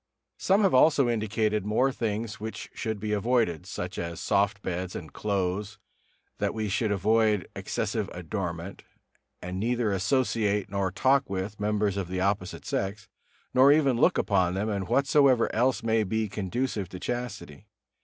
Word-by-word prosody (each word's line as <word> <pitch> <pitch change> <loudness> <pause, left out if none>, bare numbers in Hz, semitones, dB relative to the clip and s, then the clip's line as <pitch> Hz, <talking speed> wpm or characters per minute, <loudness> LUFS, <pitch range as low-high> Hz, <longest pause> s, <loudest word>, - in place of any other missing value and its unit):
Some 195 +3 +3
have 195 - +3
also 140 0 +5
indicated 110 -2 0
more 110 +6 +2
things 110 -2 -3
which 110 +1 -6
should 110 -3 -3
be 105 +1 -3
avoided, 105 -6 +1
such 90 -1 -5
as 85 -1 -4
soft 100 0 +1
beds 90 +1 -3
and 80 -5 -8
clothes, 100 0 -2 0.6
that - - -1
we 110 -2 -2
should 105 +2 0
avoid 105 +1 +2
excessive - - -2
adornment, 90 0 -5 0.6
and 90 +1 -4
neither 120 0 0
associate 105 -1 0
nor 100 -1 0
talk 135 +7 +2
with 95 +2 -4
members 105 -1 0
of 95 -3 -2
the 90 +1 -3
opposite 95 -1 -1
sex, 100 +2 -3 0.4
nor 130 +2 +7
even 145 -4 +4
look - - +4
upon 95 -3 +1
them, 105 +3 -1
and 100 -3 -2
whatsoever 135 - +3
else 125 +3 +1
may 110 -1 +2
be 110 +2 -1
conducive 105 0 -3
to 90 - -8
chastity. 120 -10 -5
105 Hz, 155 wpm, -27 LUFS, 95-115 Hz, 0.6 s, nor